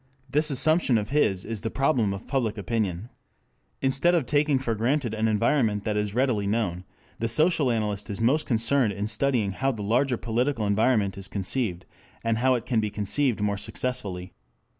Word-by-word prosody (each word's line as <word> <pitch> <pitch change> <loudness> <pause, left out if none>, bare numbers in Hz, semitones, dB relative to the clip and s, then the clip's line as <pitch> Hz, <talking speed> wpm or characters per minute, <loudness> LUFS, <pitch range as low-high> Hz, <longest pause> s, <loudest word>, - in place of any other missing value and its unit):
This 150 +4 +1
assumption 145 -1 +4
of 105 0 -3
his 100 -10 +1
is 110 -2 -4
the 115 - -2
problem 125 -5 +1
of 100 +1 -6
public 115 -6 -1
opinion. 100 0 -2 0.7
Instead 135 +7 +3
of 160 -6 +1
taking 145 0 +2
for 130 -3 -2
granted 120 +2 0
an 110 0 0
environment 110 -1 +1
that 105 0 -2
is 105 0 -2
readily 120 -6 +1
known, 100 -4 -1 0.3
the 115 - 0
social 155 +3 +2
analyst 105 -3 -2
is 100 - -4
most 130 +7 +2
concerned 115 -1 +1
in 100 +2 -3
studying 115 -3 0
how 135 +8 0
the 110 -5 -6
larger 125 +4 +1
political 120 +1 -1
environment 100 -1 +1
is 95 - -5
conceived, 95 -2 -2 0.4
and 115 -1 0
how 130 +1 +3
it 120 -1 -4
can 125 -3 +1
be 105 -1 -1
conceived 110 +4 0
more 100 -1 0
successfully. 100 -5 -4
115 Hz, 180 wpm, -26 LUFS, 105-135 Hz, 0.7 s, assumption